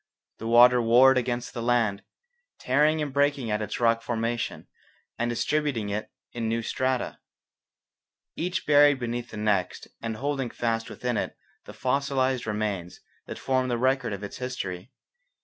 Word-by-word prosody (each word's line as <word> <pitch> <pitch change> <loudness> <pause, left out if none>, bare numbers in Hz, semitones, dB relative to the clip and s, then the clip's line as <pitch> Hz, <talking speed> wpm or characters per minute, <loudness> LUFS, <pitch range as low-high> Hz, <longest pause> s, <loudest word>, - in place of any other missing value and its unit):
The 115 - -5
water 120 +1 +7
warred 130 +3 +6
against 120 0 -3
the 120 - -4
land, 115 -4 +1 0.6
tearing 150 +4 +2
and 145 -2 -5
breaking 140 -4 +1
at 105 +1 0
its 105 - -4
rock 115 -1 +3
formation 115 0 -3 0.5
and 120 +1 0
distributing 125 -3 -1
it 105 +1 -3 0.2
in 115 -2 -3
new 115 +1 -1
strata, 130 +1 -1 1.2
each 180 +3 -2
buried 145 -1 +6
beneath 120 0 -4
the 110 - -9
next 105 -4 -1
and 115 -1 -3
holding 135 0 -2
fast 115 -1 -2
within 125 -2 -3
it - - -3 0.3
the - - -10
fossilized 130 -2 0
remains 105 -4 -3 0.3
that - - -6
form 130 -1 0
the 120 -1 0
record 130 -1 +1
of 100 0 -5
its 100 - -7
history. 125 -5 -5
120 Hz, 150 wpm, -26 LUFS, 115-130 Hz, 1.2 s, water